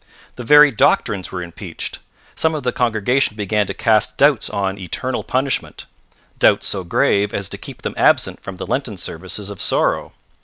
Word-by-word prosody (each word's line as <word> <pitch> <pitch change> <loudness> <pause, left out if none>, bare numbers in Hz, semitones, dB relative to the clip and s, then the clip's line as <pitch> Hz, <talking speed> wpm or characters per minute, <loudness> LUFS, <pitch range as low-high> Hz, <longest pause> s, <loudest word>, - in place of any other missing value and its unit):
The 125 - -7
very 150 +3 +7
doctrines 105 -3 +1
were 90 -1 -4
impeached. 85 +1 -7 0.4
Some 160 0 +1
of 150 - -4
the 125 - 0
congregation 125 +1 +1
began 105 0 0
to - - -4
cast 110 -1 +2
doubts 140 -4 +3
on 100 0 -2
eternal 125 +8 -3
punishment, 130 +1 -2 0.5
doubts - - +4
so 95 -2 -2
grave 100 +3 +1
as 100 - -3
to - - -6
keep - - -10
them - - -3
absent - - +2
from 95 - -8
the 90 - -6
Lenten 125 -7 -3
Services 95 +4 -6
of 100 - -8
Sorrow. - - +1
105 Hz, 170 wpm, -19 LUFS, 95-130 Hz, 0.5 s, very